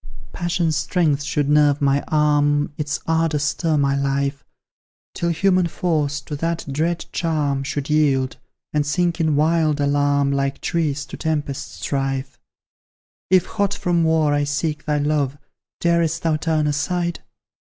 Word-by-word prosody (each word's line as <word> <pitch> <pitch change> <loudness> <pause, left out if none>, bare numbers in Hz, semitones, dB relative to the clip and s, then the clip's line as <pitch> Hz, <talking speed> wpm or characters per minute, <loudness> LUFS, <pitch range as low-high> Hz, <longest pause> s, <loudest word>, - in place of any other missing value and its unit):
Passion's 170 -2 0
strength 155 -6 +1
should 145 0 -1
nerve 145 -1 +4
my 140 -1 +2
arm, 145 -1 +2
Its 150 0 -2
ardour 165 -2 +1
stir 155 +1 0
my 140 -1 +2
life, 140 0 -1 0.7
Till 170 - -1
human 180 +1 +2
force 150 -4 -1
to 145 - -6
that 165 +2 -2
dread 165 +4 -1
charm 150 -5 0
Should 145 0 -3
yield 140 -4 +1 0.4
and 150 -1 +2
sink 170 +4 0
in 160 -2 +2
wild 155 0 +2
alarm, 145 0 +2
Like 140 0 -1
trees 150 -4 -1
to - - -9
tempest 150 -4 -3
strife. 135 -1 -2 0.9
If, 185 -2 +4
hot 200 -2 -1
from 175 -2 +1
war, 160 -2 +2
I 145 0 +1
seek 150 +1 -2
thy 150 -2 +1
love, 145 -2 0 0.4
Darest 170 -2 +1
thou 165 -2 +2
turn 155 0 0
aside? 170 +4 -1
150 Hz, 140 wpm, -21 LUFS, 145-165 Hz, 0.9 s, nerve